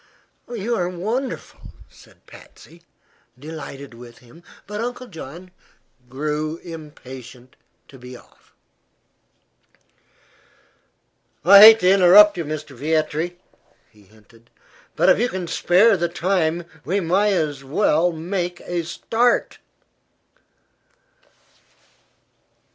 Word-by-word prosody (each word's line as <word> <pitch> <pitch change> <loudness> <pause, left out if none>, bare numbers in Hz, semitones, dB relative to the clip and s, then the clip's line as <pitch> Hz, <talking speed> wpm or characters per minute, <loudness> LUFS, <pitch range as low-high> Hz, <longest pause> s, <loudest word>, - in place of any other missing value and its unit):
"You 235 0 -3
are 180 -1 -1
wonderful," 225 +9 -5 0.3
said - - -22
Patsy, 170 +1 -17 0.6
delighted 140 -2 -10
with 120 0 -14
him. 125 +8 -19 0.2
But 210 +1 -6
Uncle 245 +1 -5
John 175 - -11 0.6
grew 150 +4 -4
impatient 130 -6 -12 0.3
to 135 - -16
be 125 0 -11
off. - - -24 2.9
"I 200 +3 +9
hate 220 +2 +9
to 180 - +4
interrupt 200 +2 +6
you, 170 -2 -4
Mr. 150 -2 -7
Vietri," 155 +4 -2 0.5
he 105 - -23
hinted; 110 +3 -24 0.5
"but - - +1
if - - +4
you 245 +2 0
can 185 -5 -5
spare 190 +6 +3
the 175 -2 -2
time 175 -1 -1 0.2
we 180 +9 -1
may 195 +3 +1
as 145 -5 -3
well 160 +3 +1
make 175 +2 -4
a 175 -1 -4
start." 230 +8 -1
170 Hz, 105 wpm, -21 LUFS, 145-195 Hz, 2.9 s, I